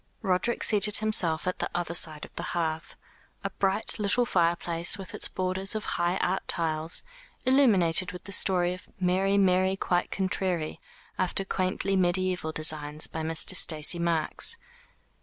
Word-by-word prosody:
Roderick 195 +4 0
seated 210 -1 +4
himself 180 -7 +1
at 185 - -2
the - - -2
other 175 -1 -2
side 155 -3 +3
of - - -19
the - - -5 0.2
hearth 160 -1 -3 0.5
a - - -3
bright 195 +3 +1
little 210 +4 +1
fire 170 -6 +1
place 170 +1 -1
with 190 -3 -9
its - - +2
border 185 0 -3
of 215 - -4
high 175 +2 -1
art 190 +1 -2
tiles, 160 -1 -1 0.4
illuminated 195 -10 +3
with 180 - -10
the 200 - -10
story 180 -2 +3
of 180 - -12
"Mary, 190 +2 +1
Mary, 190 -1 +2
quite 180 -2 -1
contrary," 185 -4 -2 0.4
after 185 +1 0
quaintly 190 +1 -2
mediaeval 180 -2 0
designs, 155 -1 0
by 160 - -5
Mr. 160 +3 +2
Stacey 160 0 +3
Marks. 170 - +1
180 Hz, 155 wpm, -27 LUFS, 165-195 Hz, 0.5 s, seated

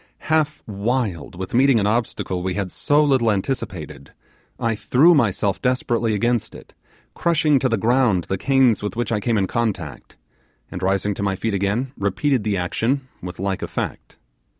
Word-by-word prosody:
Half 155 -1 +1
wild 105 - -2
with 95 +1 -6
meeting 130 -1 +4
an 100 - 0
obstacle 105 -4 -1
we 90 0 -2
had 100 -3 -3
so 150 +1 +2
little 130 -6 +3
anticipated, 95 - -3 0.5
I 115 -1 0
threw 130 - +4
myself 100 - +1
desperately 120 -3 0
against 120 +2 0
it, - - -14 0.4
crushing 155 -4 +2
to 130 - +1
the 115 - +1
ground 115 -4 +2
the 95 +2 -3
canes 135 -4 +3
with 105 -2 -4
which 120 0 -2
I 110 - +1
came 115 +2 0
in 100 - +2
contact, 100 - -3 0.5
and, 90 - -6
rising 95 +2 +1
to 100 - -6
my 100 -1 0
feet 110 +3 -2
again, 100 +7 -1
repeated 110 +6 0
the 105 -2 0
action 125 +9 -1
with 90 0 -7
like 95 0 -2
effect. - - -5
110 Hz, 170 wpm, -21 LUFS, 95-130 Hz, 0.5 s, meeting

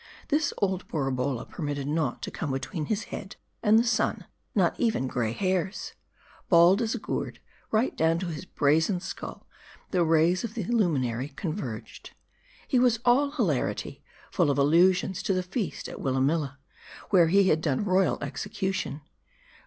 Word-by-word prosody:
This 300 0 +2
old 190 -2 -1
Borabolla 135 -4 -1
permitted 145 -3 -4
naught 150 -4 -1
to - - -4
come 155 - -4
between 145 +5 -3
his 215 +4 -1
head 195 - -6 0.3
and 215 0 +5
the 230 - +5
sun; 235 -1 0 0.3
not - - +3
even 225 - +1
gray 120 -4 -1
hairs. 185 - -2 0.6
Bald 175 +4 +6
as 225 +1 0
a - - -2
gourd, 220 - -4 0.3
right 225 +4 +1
down 165 +2 +1
on 170 - -3
his 155 +3 -6
brazen 160 +4 +2
skull, 190 +1 -7 0.5
the 180 -3 +3
rays 165 +4 +3
of 230 -1 -5
the 225 - -2
lumin 175 - +1
ary 120 +3 -3
converged. 135 - -6 0.5
He 255 - +2
was 245 -2 +3
all 265 +4 +4
hilarity; 210 - -2 0.3
full - - +2
of 140 - +1
allusions 180 +6 +3
to 195 - 0
the 185 - 0
feast 190 +3 -4
at - - -8
Wil 130 -1 0
lamilla, 145 +1 0 0.5
where 175 -5 +6
he 190 +2 +4
had 155 - +2
done 150 +5 0
royal 185 -2 +2
execution. 155 +1 -3
175 Hz, 160 wpm, -27 LUFS, 145-200 Hz, 0.6 s, Bald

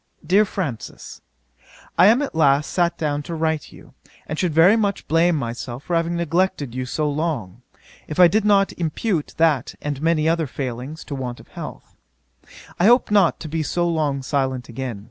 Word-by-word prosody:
'DEAR 195 +6 +4
FRANCIS, 160 - -6 0.8
'I - - +8
am 235 +6 +5
at 280 - -4
last 150 -2 +3
sat 170 -1 +1
down 145 -2 -1
to 165 +3 -6
write 160 -1 0
to - - -15
you, - - -16 0.3
and 150 - -5
should 180 -3 +1
very 165 +7 +6
much 205 -3 -1
blame 165 +2 +3
myself 120 -1 -5
for 175 - -2
having 170 +1 0
neglected 170 -5 0
you 130 0 -4
so 150 +4 -1
long, 140 - -3 0.5
if 155 - -5
I 180 - +9
did 215 +5 +1
not 200 -1 +3
impute 165 +1 -2
that 155 -6 +2
and 145 -2 -4
many 160 -1 +2
other 165 -1 +1
failings 130 +3 -5
to - - -7
want 125 -3 -5
of - - -16
health. - - -9 0.8
I 175 - +3
hope 240 -1 +4
not 200 -5 +3
to 160 - -6
be 160 +1 -2
so 175 +3 0
long 150 -5 -1
silent 130 -3 -2
again. 120 -2 -5
160 Hz, 185 wpm, -22 LUFS, 135-175 Hz, 0.8 s, I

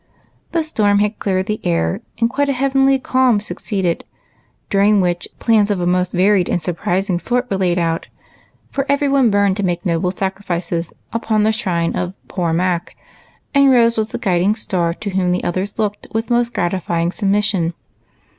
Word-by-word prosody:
The 335 -1 +1
storm 210 -10 +2
had 210 +1 0
cleared 190 -1 0
the 215 +1 -3
air, 80 -1 0 0.2
and 230 0 +2
quite 280 +4 0
a - - +2
heavenly 270 +1 +3
calm 255 -4 +2
succeeded, 195 -4 -2 0.7
during 200 +1 +4
which 175 -2 0
plans 215 -3 +3
of 200 -3 0
a 175 - -1
most 180 0 +1
varied 185 0 +3
and - - +1
surprising 175 +2 -1
sort 245 +5 -1
were 195 - +1
laid, 180 -2 +1 0.9
for 275 - -1
every 280 0 +2
one 275 -3 +3
burned 200 -1 +2
to 205 - -1
make 175 +1 -1
noble 170 0 +1
sacrifices 180 -3 -3 0.2
upon 220 -2 +1
the 220 - +3
shrine 180 -7 -1
of 180 +1 -3
"poor 175 -3 -1
Mac,'* 175 +1 -1 0.6
and 280 -1 +5
Rose 235 -3 +4
was 220 -1 0
the - - -5
guiding 190 +1 +1
star 180 -6 -1
to 205 +1 -5
whom 185 -1 +1
the 180 - -1
others 185 +3 -2
looked 210 -2 -2
with 225 +2 -2
most 240 0 +2
gratifying 175 -3 -1
submission. 195 -4 0
200 Hz, 175 wpm, -18 LUFS, 180-225 Hz, 0.9 s, and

